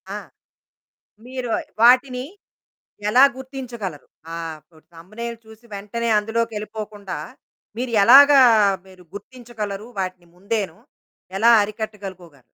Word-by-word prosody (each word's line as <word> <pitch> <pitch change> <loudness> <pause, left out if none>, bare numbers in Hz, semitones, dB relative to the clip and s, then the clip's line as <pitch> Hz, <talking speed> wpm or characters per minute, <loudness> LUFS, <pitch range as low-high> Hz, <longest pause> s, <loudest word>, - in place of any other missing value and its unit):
ఆ! - - -3 1.1
మీరు 255 -1 -5 0.3
వాటిని 250 +1 +4 0.9
ఎలా 250 +5 +6
గుర్తించగలరు 245 - -7 0.3
ఆప్ 165 0 -8 0.2
థంబ్‌నెయిల్ 215 +8 -8
చూసి 220 +1 -17
వెంటనే 210 +4 -4
అందులోకెళ్ళిపోకుండా 215 -2 -4 0.6
మీరు 250 0 -3
ఎలాగా 275 +4 +8 0.4
మీరు 185 -1 -17
గుర్తించగలరు? 215 -1 -7
వాటిని 185 -2 -5
ముందేను 200 -2 -3 0.6
ఎలా 225 +4 +4
అరికట్టగలుకోగలరు? 200 - -7
215 Hz, 85 wpm, -21 LUFS, 195-240 Hz, 1.1 s, ఎలాగా